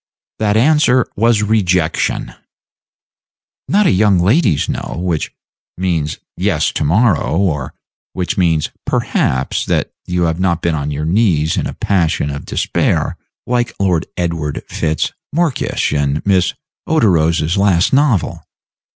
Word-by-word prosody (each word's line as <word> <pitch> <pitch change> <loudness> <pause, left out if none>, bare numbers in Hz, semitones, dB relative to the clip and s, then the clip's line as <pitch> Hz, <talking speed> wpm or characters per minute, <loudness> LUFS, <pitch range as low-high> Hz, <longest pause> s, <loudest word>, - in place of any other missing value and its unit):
That 105 -1 +1
answer 130 -1 +4
was 115 0 +2
a - - 0
rejection! 90 -6 0 1.3
Not 205 +2 +3
a - - +4
young 100 0 +3
lady's 95 - +2
No, - - -4
which 85 -3 -2 0.5
means 85 -5 -1 0.2
yes 90 -5 0
to - - -2
morrow, 90 0 +2
or 75 -9 -1 0.4
which 90 -2 -2
means 80 -4 +1 0.2
perhaps 65 +1 0
that - - -1 0.2
you 90 0 0
have 80 0 0
not 90 -2 0
been 85 - +1
on 75 -1 -2
your 75 +1 -3
knees 85 -4 +2
in - - -1
a - - -7
passion 85 -6 0
of 70 - -6
despair, - - 0 0.3
like 120 -1 -1
Lord 90 -4 +1
Edward 85 -4 -2
Fitz 80 -1 -1 0.2
Morkysh 165 - 0
in 70 0 0
Miss 95 -3 +2 0.3
Oderose's 85 - +2
last 95 -2 +2
novel. 135 - +1
90 Hz, 135 wpm, -16 LUFS, 80-105 Hz, 1.3 s, answer